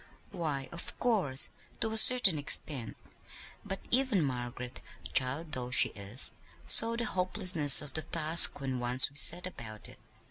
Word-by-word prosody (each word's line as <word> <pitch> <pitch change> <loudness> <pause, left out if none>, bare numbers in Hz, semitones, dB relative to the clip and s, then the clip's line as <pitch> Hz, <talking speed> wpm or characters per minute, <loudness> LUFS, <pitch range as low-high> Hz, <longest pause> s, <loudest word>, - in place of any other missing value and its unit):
"Why, 155 -7 -8
of 170 - -13
course, 180 - +1 0.3
to 225 - -4
a 220 - -6
certain 215 -10 +4
extent: 140 -4 -4 0.7
but 195 -1 -10
even 250 -8 -2
Margaret, 125 -2 -10 0.3
child 140 +5 -2
though 125 -4 -8
she 125 - +1
is, 100 +5 -12 0.3
saw 230 +1 +5
the 235 0 -7
hopelessness 180 - +3
of 145 -2 -15
the 155 - -6
task 160 0 +2
when 130 -2 -8
once 125 +2 -1
we 140 - -21
set 175 +3 +2
about 110 -12 -12
it. - - -17
150 Hz, 150 wpm, -26 LUFS, 130-185 Hz, 0.7 s, saw